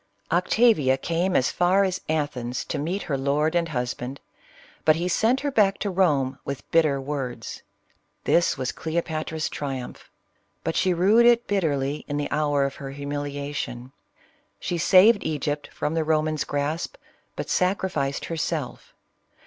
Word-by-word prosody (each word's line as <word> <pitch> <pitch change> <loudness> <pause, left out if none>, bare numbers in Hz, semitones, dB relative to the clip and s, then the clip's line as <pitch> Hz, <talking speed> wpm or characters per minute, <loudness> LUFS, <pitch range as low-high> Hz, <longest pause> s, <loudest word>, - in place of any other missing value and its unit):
Octavia 175 - +3
came 170 +6 -1
as 130 - +3
far 185 +3 +3
as 185 -1 -1
Athens 140 -6 -2
to 150 - -3
meet 175 +7 -2
her 140 -3 -2
lord 145 +4 +1
and 170 -1 +1
husband, 125 0 -3 0.6
but 155 - +5
he 170 +2 -1
sent 225 +8 +2
her 285 0 -1
back 205 -6 +3
to 200 - -2
Rome 145 -8 +1
with 140 -1 -6
bitter 155 -4 +3
words. 135 -4 -5 0.6
This 170 - +2
was 130 -1 -2
Cleopatra's 160 -1 -3
triumph, 135 -4 -6 0.5
but 165 - -2
she 185 - +2
rued 205 +7 +5
it 240 0 +4
bitterly 150 -7 0
in 145 - -2
the 145 - -3
hour 145 -2 +2
of 140 - -4
her 140 -2 -6
humiliation. 140 -2 -5 0.7
She 175 - -2
saved 195 +6 +6
Egypt 150 -1 -2
from 150 - -2
the 165 -1 +1
Roman's 155 -1 0
grasp, 145 - -2 0.4
but - - -4
sacrificed 180 -7 0
herself. 160 -4 -4
155 Hz, 145 wpm, -25 LUFS, 140-180 Hz, 0.7 s, saved